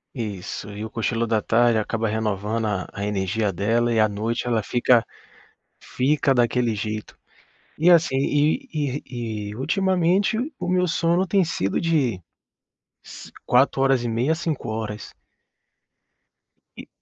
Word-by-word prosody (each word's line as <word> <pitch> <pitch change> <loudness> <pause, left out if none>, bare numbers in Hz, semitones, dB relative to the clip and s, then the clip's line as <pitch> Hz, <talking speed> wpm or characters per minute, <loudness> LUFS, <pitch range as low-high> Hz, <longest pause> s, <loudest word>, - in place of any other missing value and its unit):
Isso, 105 -2 -5
e 105 +1 -6
o 110 - -5
cochilo 115 +1 -1
da 110 -1 +2
tarde 120 +1 +3
acaba 115 +1 -1
renovando 110 +1 -1
a 100 -3 -2
a 100 0 -5
energia 100 0 -1
dela 115 +5 +1
e 110 - +2
à 110 -1 +4
noite 115 +4 -3
ela 115 -3 +1
fica 120 +1 +3 0.8
fica 140 +1 +1
daquele 120 -1 +1
jeito. 110 +1 -5 0.6
E 170 +3 +5
assim 165 -6 +4
e 150 - +1
e 120 -7 -4
e - - -8
ultimamente 185 - +1 0.2
o 180 - -4
meu 180 0 +2
sono 170 +2 +1
tem 190 -1 +2
sido 100 - -1
de 135 - 0 0.8
ci 60 - -12
4, 135 +2 +3
horas 135 -3 +2
e - - -1
meia 125 +8 0
5 160 -7 -3
horas. 110 -1 -5 1.7
E - - -10
120 Hz, 140 wpm, -23 LUFS, 110-150 Hz, 1.7 s, E